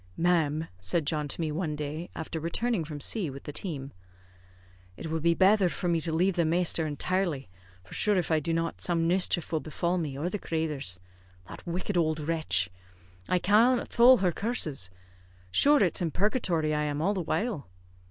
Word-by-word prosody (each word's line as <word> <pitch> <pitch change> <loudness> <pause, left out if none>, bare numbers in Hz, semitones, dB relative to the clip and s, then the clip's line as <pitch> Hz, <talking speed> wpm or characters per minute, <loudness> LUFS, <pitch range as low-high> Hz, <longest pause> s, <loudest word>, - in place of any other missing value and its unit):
"Ma'am," 160 -3 +2
said 95 - -1
John 150 0 0
to 145 - -5
me 160 -2 -1
one 155 -1 -2
day, 150 +3 -5
after 160 0 -4
returning 190 +5 -1
from 150 -1 -7
C 185 +2 +1
with 135 0 -9
the 145 - -7
team, 145 -5 -4 1.1
"it 160 - -6
would 160 0 -1
be 170 +1 +3
betther 195 0 +4
for 170 +3 -3
me 165 -1 +1
to 165 - -2
lave 180 +4 +2
the 170 - +4
masther 165 0 +1
intirely; 155 - -1 0.3
for 95 - -14
shure 210 -2 +2
if 175 -2 -1
I 160 - +4
do 160 +2 -2
not, 165 0 -2
some 165 -2 +1
mischief 175 -2 +1
will 160 - +1
befall 170 +4 -1
me 145 -5 -4
or 155 +5 -2
the 200 +3 -3
crathers. 150 - -2 0.5
That - - -11
wicked 180 +3 -2
owld 155 -1 +1
wretch! 150 - 0 0.6
I 180 - +3
cannot 225 +7 +3
thole 250 +2 +7
her 180 - +3
curses. 155 - -1 0.6
Shure 290 - +5
it's 180 - 0
in 170 - +1
purgatory 175 - 0
I 150 - 0
am 145 0 -2
all 190 +6 +1
the 190 - -2
while." 185 - -2
165 Hz, 190 wpm, -28 LUFS, 150-185 Hz, 1.1 s, thole